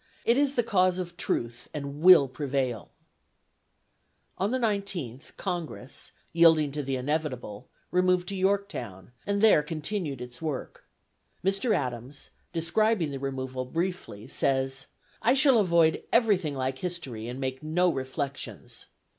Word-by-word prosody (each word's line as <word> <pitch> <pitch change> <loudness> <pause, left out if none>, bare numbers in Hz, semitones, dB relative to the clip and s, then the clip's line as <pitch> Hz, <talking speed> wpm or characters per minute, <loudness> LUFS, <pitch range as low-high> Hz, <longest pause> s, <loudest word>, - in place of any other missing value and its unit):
It 235 - +5
is 280 0 +2
the 240 - +3
cause 185 -4 +2
of 175 -2 -5
truth 120 -7 -3
and 140 0 -5
will 175 -5 +8
prevail." 130 - -2 1.5
On 195 +2 +1
the 255 - +1
19th, 195 - -3
Congress, 165 -8 -5 0.2
yielding 160 -3 +5
to 150 +1 -3
the 135 -1 -2
inevitable, 130 -6 -3 0.2
removed 180 0 +2
to 200 - -3
Yorktown 190 - -2 0.2
and 200 0 +1
there 220 -8 +6
continued 155 - -3
its 125 0 -8
work. 150 -5 -5 0.6
Mr. 195 +4 +2
Adams, 125 -1 -4 0.2
describing 170 +1 +1
the 135 - -5
removal 130 -1 -3
briefly, 165 - -4
says, 135 0 0 0.3
"I 245 +3 +4
shall 270 -4 +5
avoid 170 -5 +3
everything 200 - +3
like 130 0 -2
history, 145 -11 -4
and 125 +2 -5
make 130 -1 -3
no 175 +4 +2
reflections." 135 +1 -5
155 Hz, 130 wpm, -28 LUFS, 130-185 Hz, 1.5 s, will